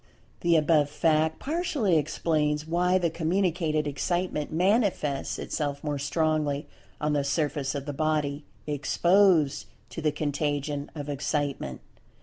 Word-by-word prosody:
The 170 -1 +3
above 150 -2 +3
fact 155 +1 +2
partially 290 - 0
explains 150 0 0
why 180 +3 +2
the 170 -3 0
communicated 165 -2 0
Excitement 150 +2 -2
manifests 180 - +1
itself 145 -2 -3
more 145 -2 -2
strongly 150 0 0 0.3
on 150 0 0
the 145 -1 +1
surface 145 -1 -1
of 140 -1 -4
the 145 - -4
body 150 -1 -1 0.2
"exposed" 155 +1 +3 0.2
to - - -5
the 155 -1 +2
contagion 145 -1 -2
of 145 -2 -5
Excitement. 140 - -2
150 Hz, 125 wpm, -27 LUFS, 145-170 Hz, 0.3 s, The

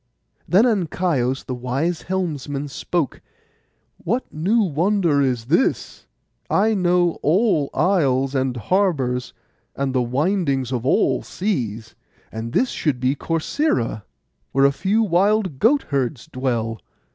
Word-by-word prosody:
Then 195 +7 +5
Ancaios, 170 - 0
the 130 - -4
wise 135 +8 -2
helmsman, 145 -6 -3
spoke, 155 0 -2 0.8
'What 240 +9 -2
new 195 +10 +2
wonder 170 -2 +1
is 125 -4 0
this? 165 - 0 0.4
I 215 +3 +3
know 175 -3 +2
all 165 -3 +2
isles, 135 -8 +1
and 130 -2 -1
harbours, 130 - 0 0.4
and 135 -1 -2
the 130 - +2
windings 135 - 0
of 125 -1 -2
all 130 -1 +2
seas; 115 - -3 0.4
and 110 +1 -5
this 255 - +2
should 145 -6 -1
be 130 +1 +1
Corcyra, 160 - -1 0.5
where 135 +1 +4
a 140 - +5
few 200 +10 +1
wild 190 -4 +1
goat 275 +5 +3
herds 135 -2 -1
dwell. 115 -4 -2
145 Hz, 125 wpm, -21 LUFS, 130-190 Hz, 0.8 s, Then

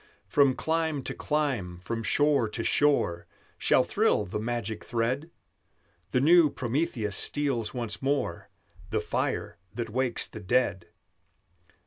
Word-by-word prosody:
"From 140 -3 +3
clime 160 -3 -1
to - - -4
clime, 130 - -1
from 115 +5 -4
shore 140 -1 +2
to 115 +2 -4
shore, 125 -15 +2 0.3
Shall - - +4
thrill - - +1
the 90 - -4
magic 110 -1 -3
thread; 125 +7 -1 0.8
The 125 - +1
new 165 +3 +6
Prometheus 125 -5 -2
steals 135 -6 0
once 115 -4 -4
more 140 +1 -1 0.4
The - - 0
fire - - -2 0.2
that 115 -2 -4
wakes 125 0 0
the 110 - -9
dead." 100 -4 0
125 Hz, 125 wpm, -28 LUFS, 110-145 Hz, 0.8 s, new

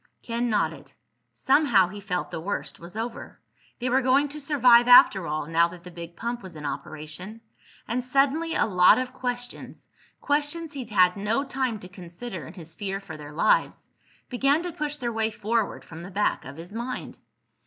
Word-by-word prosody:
Ken 235 0 -1
nodded. 215 - -1 0.4
Somehow 265 - +3
he 205 +1 -9
felt 180 -3 -3
the 160 - -5
worst 200 +5 -4
was 175 +5 -10
over. 230 +1 -6 0.4
They 245 - -3
were 260 +2 +3
going 270 +3 +3
to 300 +1 -8
survive 250 -5 +5
after 200 -7 +7
all, 150 0 -2
now 165 +2 +3
that 170 0 -12
the 180 - -10
big 170 0 -9
pump 235 +4 -4
was 185 -3 -11
in 150 -1 -8
operation. 155 +8 -6 0.5
And 245 +2 -1
suddenly 280 +6 +1
a - - +3
lot 180 -4 +6
of 255 0 -3
questions—questions 290 +5 -4
he'd 260 -5 -6
had 185 -2 +4
no 215 +7 0
time 260 -4 -2
to 180 - -9
consider 180 - -8
in 165 - -12
his 165 -3 -10
fear 195 +2 -4
for 190 -5 -9
their 150 -1 -10
lives—began 275 - 0
to 355 - -3
push 295 -1 -3
their 240 -4 -3
way 220 0 0
forward 220 0 -2
from 165 0 -10
the 175 - -8
back 205 +2 0
of 135 +3 -9
his 170 +4 -10
mind. 240 +3 -5
220 Hz, 180 wpm, -26 LUFS, 180-255 Hz, 0.5 s, after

